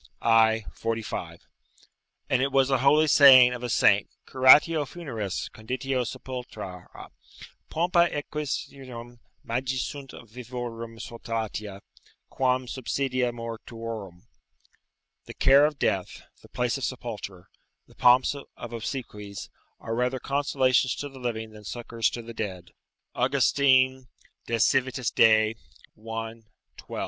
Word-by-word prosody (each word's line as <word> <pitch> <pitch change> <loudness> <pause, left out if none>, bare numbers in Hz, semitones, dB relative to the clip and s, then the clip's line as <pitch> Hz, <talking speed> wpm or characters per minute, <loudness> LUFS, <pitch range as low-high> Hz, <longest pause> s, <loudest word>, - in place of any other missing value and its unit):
i. 110 -1 +4
45.] 115 -1 -4 0.9
and 130 -1 +1
it 135 +1 0
was 135 0 +3
a 135 - +3
holy 145 +4 +4
saying 130 -4 +8
of 125 - -6
a 125 - -4
saint, 100 -2 +3 0.2
"Curatio 145 +4 +6
funeris, 130 - -5
conditio 130 +3 -2
sepultura: 110 -10 -8 0.8
pompa 170 +1 +2
exequiarum, 135 -5 -6 0.2
magis 130 +2 -2
sunt 140 -2 -8 0.2
vivorum 115 -1 -7
solatia, 110 -4 -5 0.5
quam 130 0 +1
subsidia 130 0 -2
mortuorum." 115 -5 -7 1.0
["The - - -10
care 140 +2 +5
of 150 -2 -6
death, 95 -7 -2 0.2
the - - -17
place 125 +2 -1
of - - -8
sepulture, 105 -8 -6 0.4
the - - -21
pomps 125 +3 +4
of 140 -1 -10 0.3
obsequies, 105 -4 -6 0.3
are 115 - -5
rather 125 +2 0
consolations 130 -2 +1
to 145 - -6
the 135 -1 -13
living 110 -3 -4
than 105 -1 -13
succours 115 +1 -2
to 120 - -7
the 115 +1 -9
dead." 95 -5 -6 0.4
August. 130 +1 +1
De 130 -2 +3 0.4
Civit. 125 +2 +1
Dei, 110 -1 +5 0.4
i. 115 +1 -6 0.4
12. - - -8
125 Hz, 115 wpm, -26 LUFS, 115-135 Hz, 1.0 s, saying